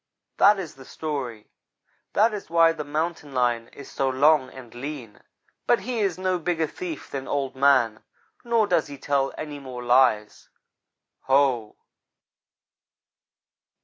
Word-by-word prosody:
"That 205 +1 +6
is 175 -5 -6
the 135 - -14
story 130 -7 -5 0.6
that 220 +2 +3
is 205 -5 -6
why 165 0 +5
the 165 -2 -5
Mountain 150 -1 -3
lion 120 -2 +1
is 140 - -12
so 135 - 0
long 135 0 +3
and 125 -3 -12
lean, 125 -3 -7 0.5
but 240 - +3
he 240 +3 -3
is 195 -5 0
no 185 -1 0
bigger 165 -1 0
thief 160 0 -7
than 135 -1 -5
Old 135 -2 -2
man, 130 -5 +3 0.4
nor 235 -2 +2
does 175 -6 +1
he 140 -1 -9
tell 135 -1 0
any 150 -2 -6
more 130 -3 -8
lies. 120 -4 +2 0.8
Ho!" 130 -5 +2
140 Hz, 140 wpm, -25 LUFS, 130-165 Hz, 0.8 s, That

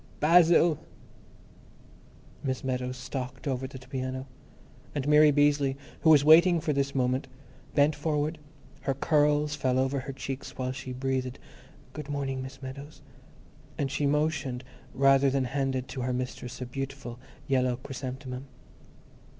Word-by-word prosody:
Basil! 165 0 +5 1.6
Miss 130 -2 -2
Meadows 125 -1 -2
stalked 130 +1 -6
over 130 -1 -1
to 130 - -9
the 130 0 -14
piano. 130 0 -4 0.7
And 145 -1 -2
Mary 150 0 +7
Beazley, 145 -2 +3 0.2
who 160 - +3
was 145 -2 +7
waiting 170 +3 +7
for 155 -1 -1
this 140 0 -1
moment, 130 +1 +1 0.5
bent 145 +1 +4
forward; 150 +1 -1 0.4
her 135 -1 -1
curls 150 +1 +2
fell 130 -2 0
over 135 +1 +1
her 135 +1 -6
cheeks 135 0 -6
while 130 -1 -2
she 130 0 -6
breathed, 130 0 -2 0.6
"Good 150 -2 -7
morning, 135 -2 -2
Miss 135 +1 -9
Meadows," 140 +3 -9 0.7
and 135 -2 -1
she 145 - 0
motioned 150 -4 0 0.3
towards - - -13
rather 135 0 +5
than 135 0 +1
handed 135 0 -1
to 130 - -5
her 125 +1 -1
mistress 125 -1 -5
a - - -2
beautiful 125 -2 -6 0.3
yellow 130 -2 +2
chrysanthemum. 130 0 -6
135 Hz, 140 wpm, -28 LUFS, 130-145 Hz, 1.6 s, Mary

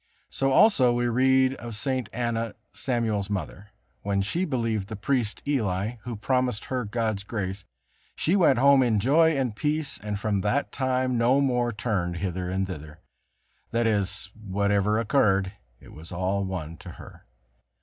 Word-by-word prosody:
So 135 - 0
also 135 - +5
we 120 0 0
read 130 +2 +3
of 120 -2 -7
St. 130 -1 -2
Anna, 115 -2 -2 0.2
Samuel's 110 -6 -1
mother: 100 +1 -5 0.3
"When 100 -1 0
she 170 - -1
believed 115 - -1
the 110 - -6
priest 110 +1 -1
Eli 110 -4 -1
who 120 -2 -4
promised 125 0 0
her 125 -3 -2
God's 110 -2 -1
grace, 100 -2 -4 0.5
she 170 - +1
went 160 -9 +4
home 140 +1 +6
in 115 -4 +2
joy 155 +7 +4
and 125 -5 -1
peace, 150 +4 -2
and 105 -1 -4
from 100 -2 0
that 105 +9 0
time 130 -2 0
no 125 +4 +4
more 125 -3 +1
turned 100 -6 -2
hither 90 0 -3
and 95 +1 0
thither," 75 -5 -8 0.7
that 115 0 0
is, 100 -3 0
whatever 100 0 0
occurred, 100 -5 +2 0.3
it - - -15
was 80 +2 -11
all 95 +2 -1
one 85 -4 -5
to - - -10
her. - - -14
110 Hz, 160 wpm, -26 LUFS, 100-130 Hz, 0.7 s, home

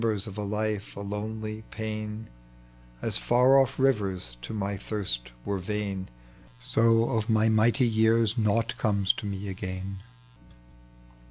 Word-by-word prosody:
The - - +3
emtiers 105 -3 0
of 100 -3 -8
a - - -2
life, 105 0 -2
a 100 - -5
londy 110 +1 -4
pain; 110 0 -4 0.8
As - - -1
far 125 +3 +5
off 135 0 -1
rivers 100 - 0
to - - -7
my 100 -2 -2
tiiirat 95 - -3 0.2
were 100 -2 -1
Tain, 100 -1 -3 0.5
So 115 - +3
of 110 -2 0
my 110 0 +4
mighty 110 +3 +4
years 110 0 +3
nought 115 0 +1
comes 100 -3 +2
to 105 - -6
me 100 0 -4
again. 95 0 -5
105 Hz, 145 wpm, -28 LUFS, 100-110 Hz, 0.8 s, far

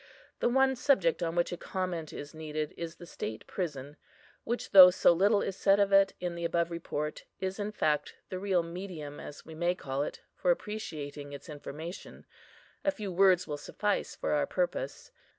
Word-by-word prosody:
The - - +2
one 265 +1 +4
subject 215 - +2
on 165 -1 -1
which 175 0 +1
a 175 - -3
comment 175 -5 -3
is 145 +2 -8
needed, 155 -1 -4
is 170 0 -5
the 175 - -11
state 110 -9 -6
prison, 145 -5 -5 0.5
which, 240 +1 -3
though 185 -2 +12
so 180 -1 +5
little 200 +4 +3
is 195 - -3
said 195 +1 +4
of 200 0 +3
it 195 0 +5
in 175 -1 -2
the 170 0 -5
above 170 0 +1
Report, 150 -2 -4 0.2
is 190 +2 -3
in 205 +1 -2
fact 150 -7 0
the 185 - -4
real 190 -3 +1
medium, 170 -4 -7
as 145 - -9
we 160 - -10
may 175 +3 0
call 135 -4 -3
it, 145 - -4
for - - -1
appreciating 155 - -3
its 140 +3 -9
information; 155 +4 -8 0.6
a - - +3
few 215 -9 -4
words 185 0 +5
will 150 -2 -4
suffice 205 +8 -2
for - - -2
our - - +2
purpose. - - -2
175 Hz, 185 wpm, -30 LUFS, 155-195 Hz, 0.6 s, though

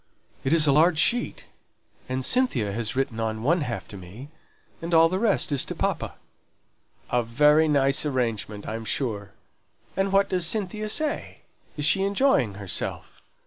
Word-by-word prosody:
"It 135 - -1
is 160 -2 +5
a 145 - +4
large 160 +3 +4
sheet, 235 +9 +1 0.6
and 130 0 -1
Cynthia 140 - +1
has 115 +1 -2
written 130 -4 -2
on 110 0 -3
one 170 +6 +2
half 125 -5 -4
to 100 - -9
me, 100 +10 -11 0.5
and 170 0 -1
all 165 0 +7
the 185 +3 -2
rest 210 -7 +1
is 140 -2 +1
to - - -6
papa." - - -2 1.0
"A 125 - +2
very 150 +7 +3
nice 140 -2 +2
arrangement, 115 -7 -2
I'm 115 +1 -4
sure. 110 -5 -3 0.6
And 195 0 0
what 195 0 +3
does 180 -3 0
Cynthia 215 +1 -3
say? 305 +6 -1 0.4
Is 150 - 0
she 190 +5 +4
enjoying 200 - +2
herself?" 100 -2 -4
145 Hz, 160 wpm, -25 LUFS, 115-180 Hz, 1.0 s, all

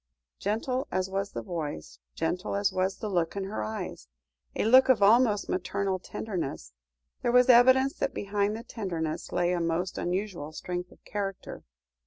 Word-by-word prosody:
Gentle 250 +6 -1
as 185 0 -1
was 195 +1 -2
the 115 - -4
voice, 145 - -5 0.2
gentle 180 +5 -2
as 200 -1 +1
was 185 +1 0
the 215 - -4
look 175 -4 0
in 200 - -2
her 190 - -4
eyes, 110 - -5 0.5
a - - 0
look 260 +4 +7
of 225 -6 +5
almost 215 0 +4
maternal 190 +1 -1
tenderness, 165 - -5 0.5
there 240 - +1
was 250 +1 +5
evidence 260 +2 +6
that - - 0
behind 205 +1 -1
the 230 - -8
tenderness, 170 -9 -4
lay 175 0 +1
a 175 - 0
most 170 +2 -1
unusual 175 -4 -3
strength 180 +2 -5
of - - -20
character. 195 -2 -5
195 Hz, 165 wpm, -28 LUFS, 175-215 Hz, 0.5 s, look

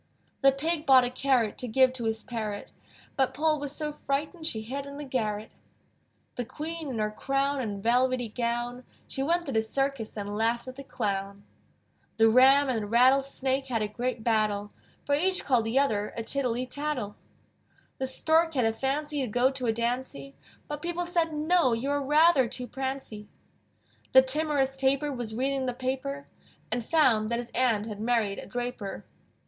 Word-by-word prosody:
The 275 0 +6
Pig 305 +3 -2
bought 260 -2 +7
a 245 - -2
carrot 255 -4 +1
To 250 - -2
give 255 +2 +4
to 240 -3 -4
his 220 -1 -1
parrot: 215 -4 -5 0.4
But 265 -1 +1
Poll 305 +1 +2
was 285 -1 -3
so 300 -1 -2
frightened 300 +3 -3
She 220 -8 -2
hid 275 +5 -5
in 280 0 -8
the 295 - -6
garret. 220 -5 -3 0.8
The 245 - -1
Queen 315 +5 -5
in 250 - -4
her 215 -1 0
crown 275 +4 -1
And 205 -4 -4
velvety 250 +1 +2
gown, 240 +2 -3 0.2
She 270 - -3
went 340 +5 +1
to 275 - -4
the 220 -3 +2
circus, 265 0 -2
And 205 0 -4
laughed 230 +3 0
at 255 - -7
the 275 - -9
clown. 200 -6 -3 0.7
The 225 0 +6
Ram 265 +4 +6
and 240 -4 0
the 205 - -5
Rattle 255 +5 +5
Snake 270 0 -1
had 230 -4 -1
a - - -1
great 240 +2 -3
battle: 210 -3 0 0.3
For 285 - 0
each 365 +5 +1
called 245 -5 +2
the 225 +4 0
other 210 -7 +1
A 230 - -2
tittlety 250 -1 -1
tattle. 285 -8 -3 0.8
The 265 - -1
Stork 320 +4 +2
had 250 -3 +2
a 225 - +2
fancy 290 +4 -1
To 260 - -1
go 245 +4 +2
to 265 -2 -3
a - - +4
dancy, 235 - -3 0.3
But 295 0 -5
people 345 +1 -2
said, 340 -2 +1
"No! 310 -3 +2
You 250 +5 -1
are 285 0 0
rather 295 -1 +5
too 250 +2 -5
prancy!" 260 -4 -5 0.8
The 260 0 +9
timorous 275 -1 0
Tapir 275 +2 +1
Was 235 -4 -5
reading 265 +1 0
the 250 - -2
paper, 270 +2 -3 0.4
And 240 - -1
found 225 -7 +3
that 235 - 0
his 240 0 -6
aunt 230 -4 +2
Had 210 -2 -7
married 220 -4 0
a - - -9
draper. 245 -3 -5
255 Hz, 185 wpm, -28 LUFS, 225-280 Hz, 0.8 s, The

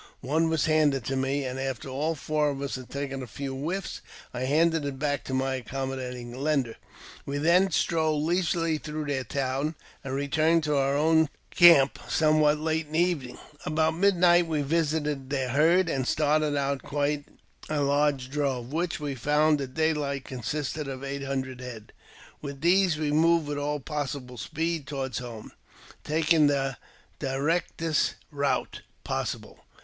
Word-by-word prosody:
One 160 +5 +1
was 160 -1 +1
handed,^ 150 -5 +3
to 135 - -1
me; 135 +1 0
and 130 +1 -4
after 135 -1 -3
all 145 +5 -1
four 150 0 0
of 140 -1 -4
us 140 0 -4
had 130 -2 -6
taken 140 -1 -4
a 125 - -6
few 135 +4 -5
whiffs, 170 +8 -4 0.3
dl 130 +1 -2
handed 160 +2 +3
it 140 -2 -4
back 145 0 -1
to 130 - -5
my 130 0 0
accommodating 125 -1 -5
lender. 135 -3 0 0.5
We 140 +1 -3
then 175 +6 +4
strolled 160 -3 +1
leisurely 165 -1 +1
through 155 0 -5
their 140 -3 -1
town, 140 +3 -2 0.3
and 135 -1 -4
returned 155 +4 +2
to 150 -1 0
our 140 0 +2
own 160 0 +4 0.2
camp: 165 -6 +7
somewhat 155 -1 +3
late 160 0 -1
in 150 - -14
the 160 - +2
evening. 170 -8 0
fll 145 - -14
About 155 +1 +2
midnight 175 -2 +4
we 155 -3 0
visited 150 -3 -1
their 135 -3 -1
herd, 165 +7 +4
and 135 -5 -1
started 150 -1 +2
out 140 -1 -1
quite 145 0 -1 0.4
a 155 -1 0
large 140 -2 +1
drove, 135 -3 -2
which 170 +1 -1
we 145 -2 -3
found 150 +3 +2
at 130 -2 -6
daylight 150 -4 0
consisted 145 +4 -3
of 135 0 -6
eight 140 0 -4
hundred 130 -2 -3
head; 115 -4 -9 0.5
with 140 -2 -7
these 180 -1 +4
we 150 -1 -1
moved 165 +1 +3
with 145 0 -2
all 145 +1 -1
possible 135 -4 -5
speed 165 -2 -2
toward 135 -4 -4
home, 120 -3 -7 0.5
taking 155 0 +3
the 135 -2 0 0.4
directest 155 +3 0 0.2
route 140 -3 -1 0.2
possible. - - -4
145 Hz, 165 wpm, -27 LUFS, 135-155 Hz, 0.5 s, camp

